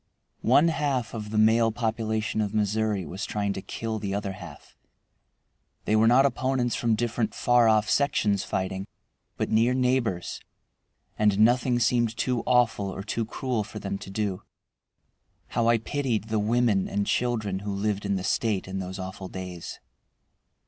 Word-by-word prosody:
One 145 +7 +6
half 140 -7 -1
of 105 -2 -5
the 110 - -3
male 115 +1 +4
population 110 -1 -1
of 105 0 -2
Missouri 105 -2 0
was 95 +7 -6
trying 100 -1 -1
to 95 - -5
kill 110 +1 -4
the 100 -1 -3
other 100 -1 -2
half. 90 -6 -11 1.1
They 110 - +2
were 110 +1 +5
not 130 +4 +6
opponents 130 -1 0
from 115 -2 +1
different 115 0 -1
far 120 -1 +4
off 110 -1 +3
sections 105 -8 +2
fighting, 95 0 -3 0.5
but - - -2
near 115 +3 +3
neighbors, 125 -8 0 0.8
and 105 -2 +3
nothing 120 +3 +4
seemed 120 -1 +1
too 125 -2 0
awful 115 -5 +2
or 95 0 -6
too 110 +2 -2
cruel 125 -3 -2
for 105 - -9
them 100 -1 -4
to 95 - -9
do. 100 -2 -2 1.1
How 115 -1 0
I 115 0 +5
pitied 115 -2 -2
the 110 -1 +1
women 110 -2 +2
and 100 0 -1
children 110 -6 0
who 100 +1 -4
lived 100 0 -1
in 100 -1 0
the 95 - -3
State 105 -2 0
in 95 +1 -4
those 95 +1 -5
awful 95 0 -6
days! 90 -2 -7
110 Hz, 160 wpm, -26 LUFS, 100-120 Hz, 1.1 s, One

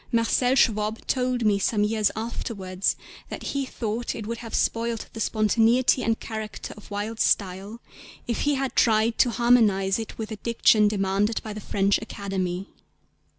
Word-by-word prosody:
Marcel 245 +2 +2
Schwob 215 -3 +1
told 250 -2 0
me 205 -2 +3
some 205 +1 +1
years 215 0 +2
afterwards 195 -4 -2 0.3
that - - -7
he 275 -1 -1
thought 230 0 -3
it 220 - -6
would 230 +1 -4
have 230 -2 -6
spoiled 230 0 -1
the 225 - -7
spontaneity 225 +4 +3
and 225 0 0
character 220 -2 -6
of 210 - -14
Wilde's 210 +2 -3
style 195 +3 0 0.5
if 235 - -2
he 290 -1 +2
had 270 -2 -2
tried 220 0 +3
to 250 - +5
harmonise 225 -5 +3
it 225 - -7
with 220 -1 -5
the 220 - -6
diction 220 -1 +3
demanded 205 +1 0
by 215 - -6
the 215 - -7
French 200 0 +1
Academy. 190 -2 -4
220 Hz, 160 wpm, -25 LUFS, 205-235 Hz, 0.5 s, to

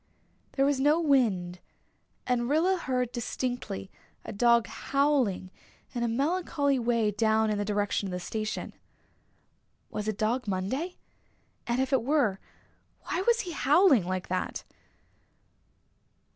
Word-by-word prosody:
There 275 - +2
was 280 -1 +1
no 295 +4 +4
wind, 215 - +1 0.7
and 245 -1 0
Rilla 335 +6 +3
heard 255 -8 -1
distinctly 240 -5 -4 0.3
a - - -6
dog 235 +2 +4
howling 270 -10 0 0.4
in 240 - -3
a 235 - +1
melancholy 285 +1 0
way 230 -3 +1
down 220 +1 +2
in 210 - -1
the - - 0
direction 205 -1 -1
of - - -5
the 180 - -3
station. 215 +4 -4 1.2
Was 210 0 -4
it 215 -2 -2
Dog 225 +3 0
Monday? 230 - -2 0.7
And 240 +1 0
if 265 +1 0
it 260 - +4
were, 245 -7 +1 0.6
why 355 - -2
was 475 0 +4
he 360 - -6
howling 285 - +4
like 185 -1 -3
that? 185 - -3
240 Hz, 130 wpm, -28 LUFS, 210-280 Hz, 1.2 s, no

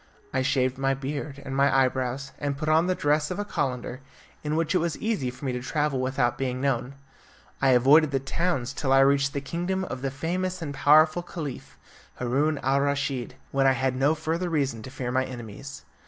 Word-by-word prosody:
I 130 - +1
shaved 130 0 +1
my 135 0 +1
beard 140 +1 -5
and 135 - -4
my 140 +1 +4 0.2
eyebrows, 130 +1 -3
and 140 -1 -2
put 155 +1 -4
on 160 +3 +4
the 185 - +1
dress 150 -1 +1
of 180 - -3
a 205 - -2
calender, 125 -7 -3 0.4
in 150 0 -1
which 165 -1 0
it 180 - +3
was 170 -1 -1
easy 210 - -1
for 130 +3 -9
me 130 - 0
to 125 0 -3
travel 150 0 0
without 130 -1 0
being 130 -1 -1
known. 135 0 -1 0.7
I 135 - +4
avoided 145 +5 +6
the 135 -1 0
towns 135 -2 -1
till 135 -1 -2
I 135 0 +6
reached 140 0 +3
the 140 - -2
kingdom 175 +6 -2
of 130 - -5
the 135 - -1
famous 180 +6 -2
and 155 -4 -5
powerful 155 +4 +5
Caliph, 155 -6 -7 0.4
Haroun 140 +5 0
al 135 +1 +2
Raschid, 140 -3 -1 0.2
when 135 0 +3
I 135 - +5
had 130 0 0
no 140 +4 +2
further 165 +3 -2
reason 140 -8 -1
to 120 - -8
fear 125 -1 -4
my 130 +1 +2
enemies. 125 +1 -8
140 Hz, 205 wpm, -26 LUFS, 130-155 Hz, 0.7 s, avoided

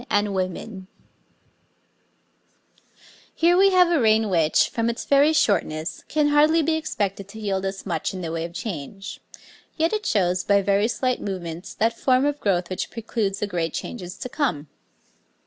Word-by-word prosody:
a - - -12
type 205 -1 +2
of 185 -3 -2
hat}] - - -8 2.7
Here 340 +2 +4
we 390 +2 +6
have 360 -2 +4
a 335 - +3
reign 220 -2 +3
which, 160 -3 +3
from 230 0 -1
its 235 - -4
very 285 +2 +4
shortness, 180 - 0
can 300 -1 +1
hardly 305 +2 +4
be 320 +2 +1
expected 200 -11 -3
to 220 +2 -11
yield 195 -2 -1
us 195 0 -6
much 165 -5 -2
in 185 - -6
the 165 -2 -4
way 165 0 -3
of 170 0 -6
change, 195 - -6 0.6
yet 325 +3 +1
it 430 0 -2
shows, 180 -4 +1
by 200 -1 +3
very 200 +2 +2
slight 255 +1 -1
movements, 175 -2 -6
that 230 +1 +1
form 255 +2 +2
of 290 0 -1
growth 180 -3 0
which 185 - -3
preludes 215 -4 -3
the - - +1
great 170 -5 -3
changes 180 -6 -6
to - - -5
come. 235 - -2
205 Hz, 175 wpm, -23 LUFS, 185-275 Hz, 2.7 s, we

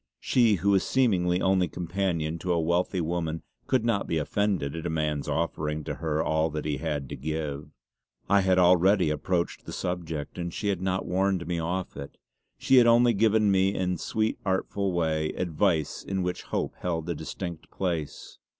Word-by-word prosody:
She, 115 -5 +3
who 100 +3 +1
was 95 -1 +3
seemingly 95 -9 +2
only 95 -1 +3
companion 85 -2 -2
to 90 - -2
a 85 - +1
wealthy 85 +3 0
woman, 80 -1 -2 0.2
could 130 -4 +1
not 115 -4 0
be 80 - 0
offended 85 -2 -1
at 80 +1 -4
a - - -3
man's 75 -2 -1
offering 75 -2 -2
to - - -4
her 80 -2 -1
all 80 +1 +1
he 75 -1 -3
had 75 -2 -3
to - - -5
give. 75 0 -4 0.6
I 100 0 +4
had 95 -1 +2
already 90 -1 +4
approached 85 +3 -2
the - - -5
subject, 85 -3 -4
and 85 0 -3
she 105 +4 -2
had 95 -3 -1
not 95 0 -1
warned 95 0 0
me 85 -1 -2
off 90 +3 -3
it; 70 0 -8 0.4
she 135 - +3
had 120 -1 +7
only 120 0 +5
given 110 0 +3
me 95 +1 +2
in 90 -1 0
a - - -3
sweetly 110 0 -1
artful 95 0 -1
way 80 -3 0
advice 85 -2 0
in 95 -1 -2
which 90 0 -2
hope - - -2
held 80 -2 -2
a 85 - -1
distinct 85 +1 -6
place. 85 -6 -4
90 Hz, 185 wpm, -27 LUFS, 80-95 Hz, 0.6 s, had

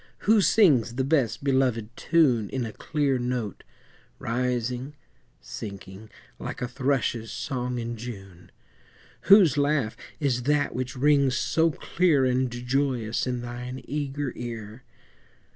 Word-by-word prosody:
Who 215 0 +4
sings 150 - +4
the 130 - 0
best 135 -4 +1
belovèd 130 -5 +1
tune 130 -11 +2
In 130 -2 -2
a 110 - -5
clear 145 -4 -1
note, 120 -4 -3 0.5
rising, 125 +3 -2 0.4
sinking, 100 0 -9 0.3
Like - - -6
a 125 - -2
thrush's 125 -3 -1
song 125 0 -3
in 120 0 -4
June? 95 -7 -9 0.8
Whose 180 -8 +7
laugh 140 -6 +1 0.2
is 130 -4 0
that 150 -1 +2
which 125 0 -4
rings 140 -1 +3
so 165 0 +2
clear 160 -2 +1
And 130 0 +1
joyous 125 -1 -1
in 125 -1 -2
thine 125 +1 -6
eager 145 -1 -3
ear? 115 -1 -7
125 Hz, 125 wpm, -26 LUFS, 120-140 Hz, 0.8 s, Whose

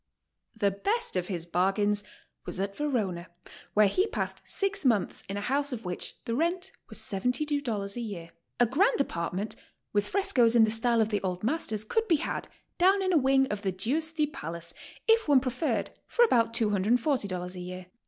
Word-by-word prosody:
The 200 -2 +2
best 405 - 0
of 180 -1 -1
his 175 -4 -3
bargains 195 +4 +1 0.4
was - - -5
at 195 0 -2
Verona, 210 -12 -1 0.5
where 210 0 +6
he 370 - +1
passed - - -3
six 395 -1 0
months 230 -7 +1
in 200 - -3
a - - -3
house 280 +6 0
of 230 -5 -5
which 180 -1 -5
the 230 - -2
rent 340 +7 0 0.2
was - - -4
$72 245 -2 0
a - - -4
year. 180 -7 -6 0.3
"A 245 - +6
grand 380 - +2
apartment, 185 -4 -2 0.4
with 205 0 +1
frescoes 250 - +3
in 230 - +7
the 220 - +3
style 230 +1 +3
of 220 - +1
the 210 -2 -1
old 185 -1 -3
masters, 220 -5 0
could 450 - 0
be 335 - +4
had, 305 - -3 0.3
down 385 +2 +4
in 370 -1 +1
a - - +5
wing 270 0 +4
of 210 -1 -3
the 195 -2 -1
Giusfi 305 - 0
palace, 170 - -6 0.3
if 450 -3 +4
one 285 -3 +6
pre 255 0 -2
ferred, 300 +6 -1 0.2
for 480 - +4
about 230 - +3
$240 210 - 0
a 180 - -7
year. 180 +1 -7
225 Hz, 185 wpm, -28 LUFS, 195-290 Hz, 0.5 s, in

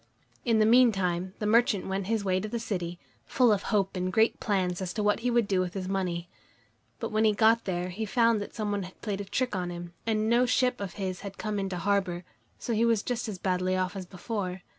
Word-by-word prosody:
In 230 -2 +3
the 215 - +4
meantime 195 -7 +3
the 210 - -3
merchant 220 -2 +3
went 190 0 -2
his 220 -2 0
way 185 -1 +2
to 210 - -4
the 235 - -3
city, 180 -7 -3 0.3
full 250 -3 +4
of 205 -2 +2
hope 200 -4 0
and 185 0 -1
great 220 +4 +3
plans 185 -4 0
as 180 -1 -3
to 210 - -1
what 210 0 +2
he 245 +2 0
would 235 -3 +2
do 190 -2 +1
with 180 0 -2
his 185 -1 -3
money. 180 -3 -2 0.7
But - - -4
when 215 +1 +2
he 215 -1 +4
got 225 +2 +4
there, 180 -1 -2
he 210 +5 -4
found 230 0 +3
that 205 - -7
some 215 -2 -2
one 205 -1 -1
had 185 0 -9
played 205 -2 -3
a - - -6
trick 245 +3 -1
on 180 -1 -2
him, 175 0 -7
and 215 -1 +1
no 240 +2 +4
ship 250 -1 +1
of 190 -3 -4
his 185 -2 -3
had 195 -1 -8
come 210 -1 -2
into 190 -2 -3
harbor, 185 -1 0 0.3
so 235 - -3
he 225 +1 +2
was 230 -3 +2
just 240 -2 -2
as 200 - -5
badly 185 0 0
off 185 +1 -1
as 185 -2 -6
before. 185 -1 -4
200 Hz, 245 wpm, -28 LUFS, 185-225 Hz, 0.7 s, the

